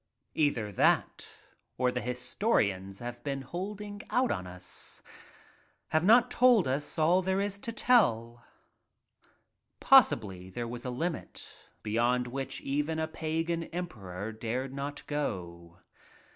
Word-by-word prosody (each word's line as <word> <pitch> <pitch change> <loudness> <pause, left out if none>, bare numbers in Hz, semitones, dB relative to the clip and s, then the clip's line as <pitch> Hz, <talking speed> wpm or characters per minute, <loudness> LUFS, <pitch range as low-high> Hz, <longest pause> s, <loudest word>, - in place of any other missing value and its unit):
Either 125 -9 +1
that - - +2 0.5
or 125 0 +2
the 125 - -3
historians 105 - 0
have 120 +1 -7
been 140 -2 -3
holding* 205 +7 -6
out 255 +1 +2
on 90 -3 -3
us— 90 0 -5 0.9
have 155 0 +2
not 230 +5 +6
told 245 - +5
us 140 +5 -2
all 170 +4 +4
there 190 +1 0
is 200 0 -2
to 230 - -4
tell. 120 - +2 1.4
Possibly 95 -3 +4
there 120 +5 -4
was 120 +1 -6
a - - -2
limit 165 +8 -5
beyond 120 +3 +1
which 135 +2 -4
even 150 +3 -1
a 160 0 -1
Pagan 165 +1 -2
emperor 110 - -6
dared 120 +4 -4
not 140 +1 -5
go. 85 - -4
135 Hz, 125 wpm, -30 LUFS, 115-170 Hz, 1.4 s, not